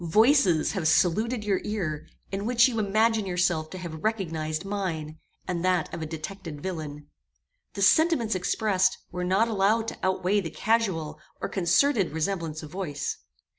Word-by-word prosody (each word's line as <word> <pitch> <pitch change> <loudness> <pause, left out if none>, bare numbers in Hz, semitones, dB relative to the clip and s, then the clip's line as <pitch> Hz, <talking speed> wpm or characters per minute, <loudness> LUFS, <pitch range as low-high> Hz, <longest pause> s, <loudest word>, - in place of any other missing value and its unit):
Voices 195 - +4
have 185 -6 -1
saluted 215 +8 +2
your 200 -2 0
ear, 175 -8 -3 0.2
in 195 +1 -3
which 240 +2 +4
you 235 -3 -2
imagine 215 +1 +2
yourself 175 -3 0
to 185 - -8
have 165 -4 -7
recognized 165 -6 -2
mine, 165 -6 -4 0.3
and 175 -2 -2
that 180 -3 +1
of - - -5
a 160 - -3
detected 160 0 -7
villain. 150 -4 -6 0.7
The 200 - -1
sentiments 310 - +4
expressed 185 +1 +1
were 180 - -3
not 190 +5 +2
allowed 220 +1 +2
to - - -10
outweigh 190 +2 +1
the 165 - -5
casual 165 -6 0 0.2
or - - -2
concerted 195 - +2
resemblance 160 -2 -2
of 150 - -9
voice. 180 -6 -3
185 Hz, 155 wpm, -27 LUFS, 160-215 Hz, 0.7 s, Voices